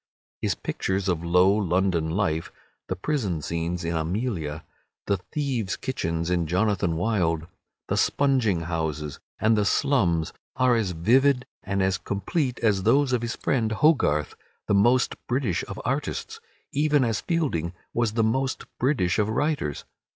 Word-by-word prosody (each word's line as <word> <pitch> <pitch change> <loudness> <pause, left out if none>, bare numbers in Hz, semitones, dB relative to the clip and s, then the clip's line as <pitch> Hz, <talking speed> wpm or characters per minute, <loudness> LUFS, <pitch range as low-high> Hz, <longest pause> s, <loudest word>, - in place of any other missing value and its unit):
His - - 0
pictures 95 +1 -2
of 85 -3 0
low 90 +3 +4
London 90 -4 +1
life, 80 -3 -1 0.4
the - - -2
prison 105 - -1
scenes 85 +2 -2
in 85 0 -1
"Amelia," 80 -3 -2 0.4
the 100 - +1
thieves' 125 - -2
kitchens 85 -10 -2
in 85 -3 +1
"Jonathan 95 -1 +1
Wild," 85 -4 0 0.4
the - - 0
sponging 130 -11 +2
houses 80 -3 -3 0.2
and 110 +1 +3
the 105 - +2
slums, 95 - +1 0.2
are 125 -1 +3
as 105 -6 0
vivid 125 +9 +3 0.2
and 100 0 -1
as 95 0 +1
complete 125 - -2
as 105 -4 +3
those 130 +6 +3
of 125 - +2
his 115 -1 -3
friend 110 -4 0
Hogarth—the 105 - +1
most 120 +6 +3
British 120 -8 0
of - - -7
artists, - - -2 0.3
even 145 -1 +2
as 115 -4 0
Fielding 140 - -1 0.2
was 120 -3 +1
the 115 0 +2
most 130 +4 0
British 120 - +1
of 105 0 +2
writers. 130 - -1
100 Hz, 145 wpm, -25 LUFS, 85-125 Hz, 0.4 s, low